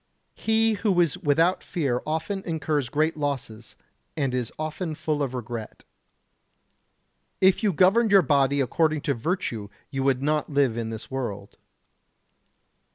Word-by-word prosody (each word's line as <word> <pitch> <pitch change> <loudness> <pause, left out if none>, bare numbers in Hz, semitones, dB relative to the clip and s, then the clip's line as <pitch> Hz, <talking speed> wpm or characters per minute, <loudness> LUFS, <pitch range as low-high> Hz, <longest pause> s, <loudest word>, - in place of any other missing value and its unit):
He 225 0 +2
who 200 -3 +1
is 170 -5 +3
without 165 +5 +2
fear 140 -9 -1
often 165 +6 -2
incurs 155 -6 -1
great 155 +4 +1
losses, 130 -6 -4 0.4
and 135 -4 0
is 125 -2 -2
often 155 +1 -4
full 150 -1 -2
of 130 -2 -2
regret. 120 -2 -6 1.6
If 190 +3 +4
you 210 -3 +2
governed 200 +7 +4
your 195 -2 +7
body 140 -1 +2
according 155 +3 +1
to 140 - 0
virtue 120 - -3 0.2
you 135 -2 -2
would 135 -1 +1
not 150 0 0
live 140 -5 +2
in 115 -1 -3
this 110 +2 -6
world. 105 -7 -5
145 Hz, 140 wpm, -25 LUFS, 125-170 Hz, 1.6 s, your